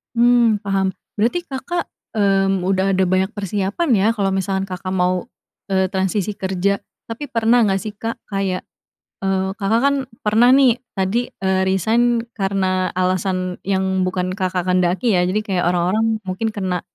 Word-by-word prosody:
Mmm, 235 Hz, -3 st, +4 dB
paham. 195 Hz, -1 st, 0 dB, 0.2 s
Berarti 235 Hz, +12 st, +1 dB
Kakak, 340 Hz, +3 st, -4 dB, 0.2 s
mmm, 195 Hz, -3 st, +2 dB
udah 195 Hz, 0 st, +2 dB
ada 190 Hz, -, +2 dB
banyak 190 Hz, +3 st, +1 dB
persiapan, 205 Hz, -, -2 dB
ya, 195 Hz, +2 st, +3 dB
kalau 200 Hz, -3 st, 0 dB
misalkan 190 Hz, 0 st, -1 dB
Kakak 185 Hz, 0 st, -4 dB
mau, 180 Hz, +2 st, +1 dB, 0.5 s
eee, 190 Hz, 0 st, +2 dB
transisi 190 Hz, +2 st, -1 dB
kerja? 190 Hz, +1 st, 0 dB, 0.3 s
Tapi 230 Hz, +6 st, -5 dB
pernah 230 Hz, -2 st, +3 dB
nggak, 195 Hz, -1 st, +1 dB
sih, 215 Hz, -1 st, -6 dB
Kak, 230 Hz, +2 st, -5 dB
kayak, 195 Hz, -2 st, -1 dB, 0.6 s
eee, 190 Hz, -1 st, 0 dB
Kakak, 210 Hz, +4 st, +2 dB
kan, 280 Hz, 0 st, +4 dB, 0.3 s
pernah, 220 Hz, +3 st, +4 dB
nih, 255 Hz, -3 st, +4 dB, 0.2 s
tadi, 195 Hz, +6 st, 0 dB
eee, 190 Hz, 0 st, +1 dB
resign 230 Hz, +5 st, +2 dB
karena 190 Hz, -2 st, 0 dB
alasan 185 Hz, 0 st, -1 dB
yang 190 Hz, -1 st, 0 dB
bukan 185 Hz, 0 st, -2 dB
Kakak 185 Hz, -2 st, -1 dB
kehendaki, 185 Hz, +5 st, +1 dB
ya, -, -, +3 dB
jadi 200 Hz, +4 st, +1 dB
kayak 185 Hz, -4 st, -1 dB
orang-orang 180 Hz, +5 st, +1 dB, 0.2 s
mungkin 190 Hz, +4 st, -2 dB
karena, 190 Hz, -4 st, -2 dB
195 Hz, 150 wpm, -20 LUFS, 185-220 Hz, 0.6 s, Mmm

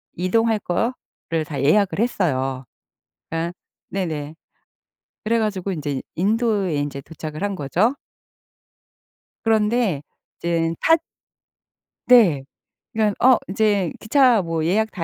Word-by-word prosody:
이동할 220 Hz, +5 st, +1 dB
거를 175 Hz, -5 st, -3 dB
다 145 Hz, -3 st, -4 dB
예약을 200 Hz, +8 st, +3 dB
했어요. 135 Hz, -, 0 dB, 0.7 s
그러니까 165 Hz, +1 st, -2 dB, 0.4 s
네네. 155 Hz, -5 st, -3 dB, 0.9 s
그래 230 Hz, +2 st, +2 dB
가지고 200 Hz, -3 st, -1 dB
인제 145 Hz, -5 st, -3 dB
인도에 205 Hz, -3 st, +1 dB
인제 145 Hz, -1 st, -3 dB
도착을 155 Hz, +3 st, -8 dB
한 200 Hz, -1 st, -1 dB
거죠. 185 Hz, -, +1 dB, 1.5 s
그런데 220 Hz, -, +2 dB, 0.4 s
이젠 165 Hz, -1 st, 0 dB
타 325 Hz, -, +6 dB, 1.1 s
네. 195 Hz, -, +6 dB, 0.5 s
그러니깐 215 Hz, -2 st, +1 dB
어 260 Hz, -2 st, +7 dB
인제 200 Hz, -3 st, +1 dB
기차 245 Hz, -1 st, +4 dB
뭐 165 Hz, -1 st, -2 dB
예약 220 Hz, +5 st, +1 dB
다 175 Hz, -, -4 dB
190 Hz, 225 characters per minute, -22 LUFS, 160-220 Hz, 1.5 s, 어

